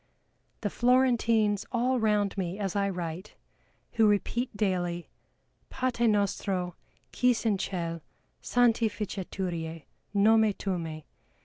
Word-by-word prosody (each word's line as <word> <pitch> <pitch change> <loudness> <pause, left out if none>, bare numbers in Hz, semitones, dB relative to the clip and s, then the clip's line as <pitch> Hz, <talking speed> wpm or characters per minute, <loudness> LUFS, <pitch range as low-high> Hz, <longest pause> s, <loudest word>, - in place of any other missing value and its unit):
The 205 - -2
Florentines 230 -5 +3
all 250 +1 +1
round 210 -2 +1
me 185 -1 -3
as 195 -3 -3
I 200 0 +1
write, 175 +1 -5 0.6
who 225 -2 +4
repeat 210 +3 0
daily, 175 -4 -1 0.6
"Pate 240 -2 +1
nostro 195 -3 0 0.4
quis 250 -2 +2
in 205 -4 +2
cell, 170 -4 -3 0.4
santi 235 -2 +3
ficeturie 180 -6 -4 0.3
nome 220 +1 +5
tumme!" 165 -6 -4
205 Hz, 105 wpm, -28 LUFS, 180-225 Hz, 0.6 s, nome